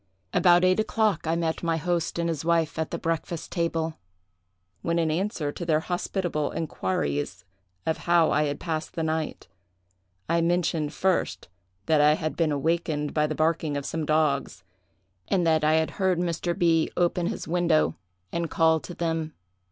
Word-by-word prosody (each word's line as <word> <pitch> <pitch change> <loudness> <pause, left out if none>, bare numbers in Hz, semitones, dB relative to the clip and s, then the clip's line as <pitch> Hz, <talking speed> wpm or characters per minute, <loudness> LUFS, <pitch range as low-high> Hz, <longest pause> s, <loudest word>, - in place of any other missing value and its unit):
About 175 0 +5
eight 185 +2 +3
o'clock 215 -6 +1
I 165 - +2
met 165 -1 -1
my 165 -1 0
host 170 +1 -1
and 170 0 0
his 160 -3 -2
wife 165 -2 +1
at 160 - -1
the - - -3
breakfast 165 0 -3
table, 165 -2 -1 0.8
when, 170 0 0
in 165 -2 +1
answer 170 -3 -1
to 175 - -7
their 160 -2 +2
hospitable 175 -3 -2
inquiries 95 - -2 0.4
of 160 - 0
how 170 -2 +3
I 150 +1 +2
had 145 -1 -3
passed 160 -2 -3
the 165 - -1
night, 160 0 -2 0.8
I 170 +1 +2
mentioned, 165 -3 +1
first, 185 - -1 0.4
that 155 -2 +4
I 150 +1 +6
had 155 -1 -3
been 165 -3 +1
awaked 150 0 -1
by 150 -1 +2
the 155 - -3
barking 155 -2 0
of 140 - -4
some 160 -1 -2
dogs, 155 -3 +1 0.6
and 180 -3 +1
that 160 -1 +3
I 155 +1 +4
had 160 0 +2
heard 190 -2 +1
Mr. 170 0 -1
B—— 165 -2 +3
open 175 0 +1
his - - -4
window 165 - +2 0.4
and 170 -1 -2
call 160 0 +3
to 175 - -9
them. 160 -2 -2
165 Hz, 170 wpm, -26 LUFS, 155-170 Hz, 0.8 s, I